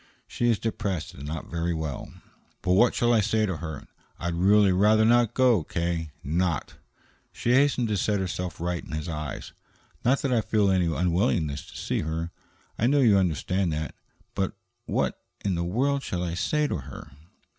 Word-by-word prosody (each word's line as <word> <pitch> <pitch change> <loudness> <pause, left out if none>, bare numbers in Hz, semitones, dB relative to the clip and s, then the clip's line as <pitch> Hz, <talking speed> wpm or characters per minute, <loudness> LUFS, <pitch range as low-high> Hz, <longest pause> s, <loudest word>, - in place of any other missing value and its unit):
She 120 - 0
is 115 - +3
depressed 100 -7 -3
and 70 +2 -9
not 80 +1 -4
very 85 0 -1
well." 80 -3 -4 0.5
"But 90 - +1
what 120 +6 +4
shall 120 0 +3
I 110 - +4
say 110 +1 +1
to 95 -5 -2
her? 80 -3 -6 0.3
I'd 85 +1 -3
really 100 +3 +4
rather 105 +4 +4
not 120 -1 +4
go, 125 -9 +4
K. 85 0 -2
Not," 85 0 -1 0.6
she 120 - 0
hastened 130 -2 +3
to 105 - +1
set 105 +1 +1
herself 90 -1 -3
right 85 0 -2
in - - -9
his 75 +3 -3
eyes 75 -3 -5 0.5
"not 130 +3 +2
that 135 -2 +1
I 115 - +3
feel 105 -3 +2
any 90 -2 +2
unwillingness 85 -3 0
to - - -11
see - - -1
her. 80 +2 -3 0.5
I 115 - +3
know 145 +2 +3
you 110 -6 +5
understand 90 0 0
that. 75 0 -3 0.4
But 95 -1 -1 0.3
what - - -1 0.2
in 100 - +1
the 85 0 -1
world 135 +10 0
shall 90 -8 -3
I 85 -2 -2
say 150 - +1
to - - -1
her?" 70 -1 -10
90 Hz, 185 wpm, -26 LUFS, 85-110 Hz, 0.6 s, you